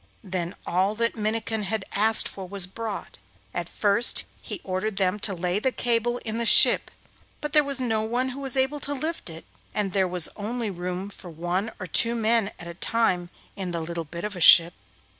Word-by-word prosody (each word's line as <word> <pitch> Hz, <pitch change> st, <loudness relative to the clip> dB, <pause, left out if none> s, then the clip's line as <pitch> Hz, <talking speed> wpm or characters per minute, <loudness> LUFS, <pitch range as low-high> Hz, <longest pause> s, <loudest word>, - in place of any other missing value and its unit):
Then 180 Hz, -2 st, -4 dB
all 190 Hz, +4 st, +1 dB
that 230 Hz, +1 st, 0 dB
Minnikin 220 Hz, 0 st, -2 dB
had 205 Hz, 0 st, -2 dB
asked 220 Hz, +2 st, +4 dB
for 190 Hz, -2 st, -7 dB
was 195 Hz, -2 st, +2 dB
brought; 210 Hz, -, -7 dB, 0.3 s
and 175 Hz, -1 st, -4 dB
first 210 Hz, +3 st, +3 dB, 0.2 s
he -, -, -7 dB
ordered 195 Hz, +2 st, -3 dB
them 190 Hz, +1 st, +1 dB
to 200 Hz, -1 st, -1 dB
lay 180 Hz, +2 st, -1 dB
the 260 Hz, +4 st, 0 dB
cable 240 Hz, 0 st, 0 dB
in 225 Hz, +1 st, -3 dB
the 235 Hz, -, -1 dB
ship, -, -, +7 dB, 0.5 s
but 295 Hz, -1 st, -5 dB
there 300 Hz, -, +6 dB
was 280 Hz, -1 st, -3 dB
no 225 Hz, -4 st, 0 dB
one 240 Hz, +4 st, -1 dB
who 260 Hz, +2 st, -7 dB
was 270 Hz, -1 st, -3 dB
able 265 Hz, +3 st, +1 dB
to 285 Hz, 0 st, -4 dB
lift 315 Hz, -, -4 dB
it, 165 Hz, 0 st, -10 dB, 0.3 s
and 205 Hz, -2 st, -1 dB
there 190 Hz, -2 st, +2 dB
was 180 Hz, -2 st, +1 dB
only 220 Hz, +1 st, -3 dB
room 180 Hz, +2 st, -5 dB
for 185 Hz, -2 st, -8 dB
one 175 Hz, +6 st, -3 dB
or 185 Hz, -, -5 dB
two 230 Hz, +6 st, +1 dB
men 225 Hz, -2 st, +2 dB
at 175 Hz, -, -10 dB
a 170 Hz, -, -7 dB
time 180 Hz, -2 st, 0 dB, 0.3 s
in 190 Hz, -2 st, -4 dB
the 170 Hz, -1 st, -3 dB
little 170 Hz, +1 st, -4 dB
bit 170 Hz, +3 st, -8 dB
of 210 Hz, -1 st, -4 dB
a 175 Hz, -, -7 dB
ship. 170 Hz, +1 st, +8 dB
205 Hz, 205 wpm, -25 LUFS, 180-230 Hz, 0.5 s, ship